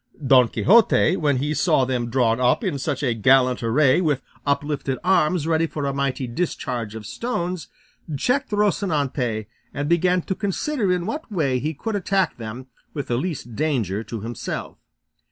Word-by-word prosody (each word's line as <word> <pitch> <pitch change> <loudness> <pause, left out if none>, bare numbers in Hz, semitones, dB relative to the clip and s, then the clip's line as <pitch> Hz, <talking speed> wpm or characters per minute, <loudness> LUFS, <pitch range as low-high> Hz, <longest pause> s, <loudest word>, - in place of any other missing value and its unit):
Don 130 -2 +6
Quixote, 215 - +4
when 145 -6 +1
he 145 +4 -1
saw 155 -4 +2
them 125 -2 -2
drawn 120 -2 +2
up 125 0 +2
in 140 - -1
such 145 +1 -2
a 125 -4 +2
gallant 125 +3 +3
array 130 +6 +3
with 150 -6 0 0.2
uplifted 140 -2 -1
arms 175 -3 +2
ready 165 0 +2
for 150 -2 -4
a 140 - -1
mighty 135 -1 -1
discharge 120 -5 -3
of 110 -1 -7
stones, 180 - -3 0.5
checked 250 - 0
Rocinante 150 - 0 0.3
and 145 +1 -2
began 175 +2 +2
to - - -2
consider 205 - -1
in 180 -1 0
what 295 - -5
way 140 -9 0
he 155 +4 -3
could 220 +9 -3
attack 190 -2 0
them 115 +2 -7 0.3
with 145 -3 -4
the 120 - +1
least 135 -6 -4
danger 115 - -1
to 115 -2 -6
himself. 115 +2 -5
145 Hz, 165 wpm, -23 LUFS, 125-180 Hz, 0.5 s, Don